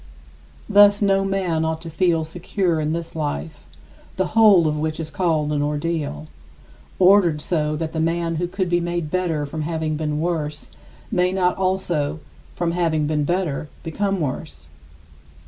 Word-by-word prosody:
Thus 205 Hz, 0 st, +6 dB
no 195 Hz, -1 st, +2 dB
man 190 Hz, -5 st, 0 dB
ought 160 Hz, 0 st, -1 dB
to 165 Hz, -, -8 dB
feel 165 Hz, -1 st, +2 dB
secure 175 Hz, +1 st, -1 dB
in 155 Hz, 0 st, -1 dB
this 165 Hz, 0 st, -4 dB
life, 80 Hz, -, -3 dB, 0.6 s
the 190 Hz, -1 st, 0 dB
whole 210 Hz, -7 st, +6 dB
of 150 Hz, -, 0 dB
which 155 Hz, +1 st, -2 dB
is 160 Hz, -1 st, -5 dB
called 155 Hz, -2 st, 0 dB
an 145 Hz, -1 st, 0 dB
ordeal, 150 Hz, -, -2 dB, 0.7 s
ordered 180 Hz, -4 st, +5 dB
so 150 Hz, -1 st, -1 dB
that 160 Hz, +1 st, -4 dB
the 160 Hz, -, -2 dB
man 165 Hz, 0 st, 0 dB
who 175 Hz, +2 st, -1 dB
could 185 Hz, +1 st, -2 dB
be 175 Hz, 0 st, +2 dB
made 175 Hz, -2 st, -3 dB
better 170 Hz, -5 st, 0 dB
from 155 Hz, +2 st, -5 dB
having 160 Hz, -1 st, -2 dB
been 150 Hz, -1 st, -2 dB
worse 155 Hz, -3 st, -3 dB, 0.4 s
may 180 Hz, 0 st, +2 dB
not 180 Hz, -1 st, +1 dB
also 175 Hz, -6 st, -1 dB, 0.4 s
from 170 Hz, -1 st, -1 dB
having 165 Hz, -3 st, +1 dB
been 150 Hz, -1 st, 0 dB
better 165 Hz, -4 st, -1 dB
become 195 Hz, +4 st, -1 dB
worse. 75 Hz, -, -4 dB
165 Hz, 160 wpm, -22 LUFS, 150-180 Hz, 0.7 s, Thus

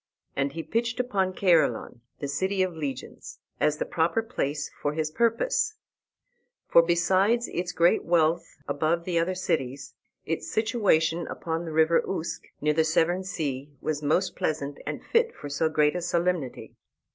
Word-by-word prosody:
And 135 Hz, 0 st, 0 dB
he 165 Hz, -, -4 dB
pitched 230 Hz, +4 st, -1 dB
upon 195 Hz, -7 st, 0 dB
Caerleon, 170 Hz, -9 st, +2 dB, 0.2 s
the 140 Hz, -, -4 dB
City 190 Hz, +7 st, 0 dB
of 180 Hz, -2 st, -3 dB
Legions, 140 Hz, -5 st, -6 dB, 0.2 s
as 150 Hz, 0 st, +2 dB
the -, -, -2 dB
proper 170 Hz, +7 st, +1 dB
place 150 Hz, -, -3 dB
for 145 Hz, -, 0 dB
his 155 Hz, 0 st, -2 dB
purpose. 435 Hz, -, +1 dB, 0.9 s
For, 170 Hz, -, +7 dB
besides 190 Hz, +7 st, +2 dB
its 175 Hz, 0 st, -2 dB
great 170 Hz, +1 st, +3 dB
wealth 165 Hz, 0 st, +1 dB
above 155 Hz, +4 st, 0 dB
the 175 Hz, -2 st, +1 dB
other 180 Hz, +3 st, 0 dB
cities, 140 Hz, -7 st, -2 dB, 0.3 s
its 165 Hz, -, -3 dB
situation 175 Hz, -8 st, +2 dB
upon 165 Hz, 0 st, -3 dB
the 165 Hz, -, -5 dB
river 160 Hz, +1 st, +4 dB
Usk, 170 Hz, -4 st, -3 dB, 0.2 s
near 150 Hz, +1 st, +2 dB
the 160 Hz, +1 st, +3 dB
Severn 170 Hz, +3 st, +2 dB
sea, 145 Hz, -7 st, -3 dB
was 150 Hz, -1 st, -2 dB
most 160 Hz, +6 st, +1 dB
pleasant 145 Hz, -2 st, -2 dB
and -, -, -4 dB
fit 465 Hz, 0 st, +2 dB
for 145 Hz, -, -8 dB
so 145 Hz, +3 st, +1 dB
great 150 Hz, 0 st, +2 dB
a 180 Hz, -, -1 dB
solemnity. 170 Hz, -5 st, -1 dB
165 Hz, 155 wpm, -27 LUFS, 150-185 Hz, 0.9 s, For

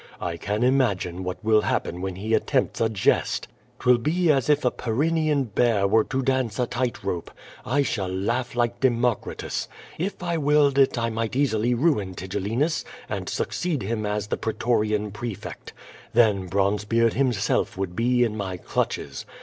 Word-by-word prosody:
I 85 Hz, -1 st, -3 dB
can 105 Hz, +6 st, -2 dB
imagine 100 Hz, -9 st, +1 dB
what 90 Hz, +3 st, -5 dB
will 110 Hz, -1 st, +4 dB
happen 90 Hz, -3 st, -2 dB
when 95 Hz, -1 st, -3 dB
he 110 Hz, +4 st, -3 dB
attempts -, -, +1 dB
a 115 Hz, -, +3 dB
jest. 105 Hz, -3 st, +1 dB, 0.3 s
^Twill 125 Hz, -1 st, +4 dB
be 165 Hz, +4 st, +2 dB
as 135 Hz, -1 st, +1 dB
if 150 Hz, -2 st, +3 dB
a 125 Hz, -, +4 dB
Pyrennean 150 Hz, +4 st, +1 dB
bear 110 Hz, -3 st, +2 dB
were 110 Hz, +2 st, +4 dB
to 135 Hz, 0 st, -2 dB
dance 130 Hz, -5 st, 0 dB
a 125 Hz, -, +2 dB
tight 125 Hz, 0 st, -2 dB
rope. 90 Hz, -3 st, -3 dB, 0.4 s
I 140 Hz, +4 st, +2 dB
shall 100 Hz, -8 st, -2 dB
laugh 120 Hz, +7 st, -1 dB
like 120 Hz, 0 st, 0 dB
Democritus. 120 Hz, -3 st, 0 dB, 0.3 s
If 190 Hz, +2 st, -3 dB
I 170 Hz, -1 st, 0 dB
willed 145 Hz, -1 st, +3 dB
it 135 Hz, -2 st, +4 dB
I 115 Hz, 0 st, 0 dB
might 115 Hz, +1 st, -2 dB
easily 120 Hz, -3 st, +2 dB
ruin 115 Hz, -, +1 dB
Tigellinus 105 Hz, -, -1 dB, 0.3 s
and -, -, -3 dB
succeed 165 Hz, -, -2 dB
him 110 Hz, +1 st, -2 dB
as 105 Hz, 0 st, -1 dB
the -, -, -2 dB
pretorian 110 Hz, -2 st, 0 dB
prefect. 110 Hz, -2 st, -6 dB, 0.4 s
Then 105 Hz, -5 st, +3 dB
Bronzebeard 105 Hz, +4 st, +1 dB
himself 120 Hz, -8 st, 0 dB
would 95 Hz, -2 st, -3 dB
be 125 Hz, +2 st, +3 dB
in 110 Hz, -3 st, -1 dB
my 95 Hz, -3 st, -4 dB
clutches. -, -, -3 dB
115 Hz, 165 wpm, -25 LUFS, 105-130 Hz, 0.4 s, will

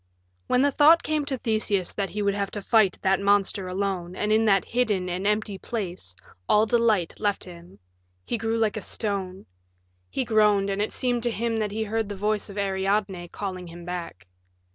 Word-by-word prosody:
When 250 Hz, -, +3 dB
the 285 Hz, -, +3 dB
thought 310 Hz, +4 st, +6 dB
came 305 Hz, -2 st, -1 dB
to 275 Hz, -2 st, -2 dB
Theseus 215 Hz, -6 st, 0 dB
that 200 Hz, -2 st, -2 dB
he 210 Hz, 0 st, -3 dB
would 200 Hz, 0 st, +2 dB
have 200 Hz, -1 st, -2 dB
to -, -, -4 dB
fight 215 Hz, -4 st, +3 dB
that 190 Hz, 0 st, +3 dB
monster 200 Hz, -1 st, +2 dB
alone 185 Hz, -2 st, -3 dB
and 210 Hz, +2 st, -1 dB
in 220 Hz, +1 st, +4 dB
that 195 Hz, -3 st, +3 dB
hidden 215 Hz, -7 st, 0 dB
and 180 Hz, +2 st, -2 dB
empty 210 Hz, -2 st, 0 dB
place 180 Hz, -, -5 dB, 0.3 s
all 210 Hz, +1 st, +5 dB
delight 220 Hz, -6 st, +1 dB
left 205 Hz, -2 st, 0 dB
him; 175 Hz, 0 st, -13 dB, 0.5 s
he -, -, -2 dB
grew 225 Hz, 0 st, -1 dB
like 220 Hz, -2 st, +1 dB
a -, -, -3 dB
stone; 195 Hz, -3 st, -4 dB, 0.6 s
he 260 Hz, -, -2 dB
groaned, 210 Hz, -3 st, +3 dB
and 195 Hz, +1 st, -1 dB
it 210 Hz, -, -1 dB
seemed 245 Hz, -2 st, -1 dB
to 240 Hz, -, +1 dB
him 230 Hz, 0 st, -1 dB
that 215 Hz, -1 st, 0 dB
he 220 Hz, +2 st, -2 dB
heard 220 Hz, 0 st, -2 dB
the 205 Hz, -, -4 dB
voice 210 Hz, +2 st, -1 dB
of 200 Hz, -, -9 dB
Ariadne 195 Hz, -2 st, -1 dB
calling 185 Hz, -1 st, -6 dB
him 170 Hz, 0 st, -10 dB
back. 175 Hz, -, -6 dB
205 Hz, 195 wpm, -25 LUFS, 190-220 Hz, 0.6 s, thought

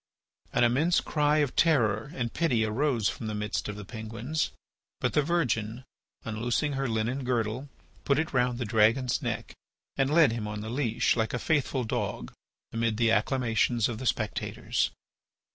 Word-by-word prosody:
An -, -, +2 dB
immense 145 Hz, +9 st, +3 dB
cry 150 Hz, -1 st, +1 dB
of 130 Hz, -, -10 dB
terror 120 Hz, -6 st, +2 dB
and 120 Hz, -3 st, -3 dB
pity 125 Hz, -10 st, +2 dB
arose 115 Hz, -1 st, +1 dB
from 110 Hz, -, -3 dB
the 110 Hz, -, -3 dB
midst 105 Hz, 0 st, -2 dB
of 105 Hz, -, -4 dB
the 105 Hz, -1 st, -8 dB
Penguins. 115 Hz, +8 st, -3 dB, 0.5 s
But -, -, 0 dB
the 150 Hz, -, +4 dB
virgin, 125 Hz, -8 st, 0 dB, 0.4 s
unloosing 120 Hz, +6 st, -1 dB
her 135 Hz, -1 st, -1 dB
linen 115 Hz, +5 st, -1 dB
girdle, 125 Hz, +2 st, -1 dB, 0.3 s
put 140 Hz, -, +2 dB
it 160 Hz, +1 st, -1 dB
round 125 Hz, -1 st, +2 dB
the 120 Hz, -, -2 dB
dragon's 115 Hz, +4 st, +3 dB
neck -, -, -3 dB, 0.4 s
and 135 Hz, 0 st, +2 dB
led 160 Hz, -5 st, +6 dB
him 115 Hz, -2 st, -3 dB
on 105 Hz, 0 st, -4 dB
the 110 Hz, +1 st, -5 dB
leash 120 Hz, -3 st, +1 dB
like 110 Hz, 0 st, 0 dB
a -, -, 0 dB
faithful 135 Hz, -1 st, 0 dB
dog 110 Hz, -, -3 dB, 0.4 s
amid 115 Hz, -1 st, 0 dB
the 115 Hz, -1 st, +3 dB
acclamations 115 Hz, 0 st, +2 dB
of 115 Hz, -2 st, -5 dB
the 130 Hz, -, -3 dB
spectators. 105 Hz, -6 st, -1 dB
120 Hz, 165 wpm, -28 LUFS, 110-135 Hz, 0.5 s, led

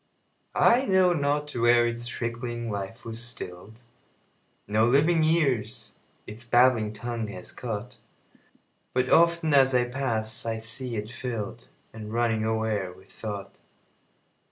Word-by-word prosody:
I 255 Hz, +3 st, +4 dB
know 185 Hz, -2 st, +4 dB
not 145 Hz, -1 st, 0 dB
where 120 Hz, -1 st, +4 dB
its 120 Hz, 0 st, -2 dB
trickling 120 Hz, -1 st, -4 dB
life 100 Hz, +3 st, -6 dB
was 115 Hz, +1 st, -5 dB
still'd; 110 Hz, -1 st, -9 dB, 0.8 s
No 110 Hz, +2 st, +2 dB
living 150 Hz, +7 st, +4 dB
ears 135 Hz, -10 st, 0 dB, 0.3 s
its 110 Hz, +3 st, -8 dB
babbling 120 Hz, -3 st, +4 dB
tongue 115 Hz, 0 st, -4 dB
has 90 Hz, -3 st, -8 dB
caught; 120 Hz, +1 st, -6 dB, 1.0 s
But 130 Hz, 0 st, +1 dB
often, 170 Hz, -2 st, +4 dB
as 135 Hz, -2 st, +5 dB
I 125 Hz, -1 st, +4 dB
pass, 115 Hz, -4 st, -2 dB
I 115 Hz, -1 st, -2 dB
see 115 Hz, +2 st, -5 dB
it 105 Hz, 0 st, -4 dB
fill'dAnd 120 Hz, -2 st, -5 dB, 0.5 s
running 115 Hz, -1 st, +1 dB
o'er 110 Hz, -4 st, -1 dB
with 95 Hz, +1 st, -17 dB
thought. 100 Hz, -2 st, -7 dB
120 Hz, 125 wpm, -27 LUFS, 110-130 Hz, 1.0 s, as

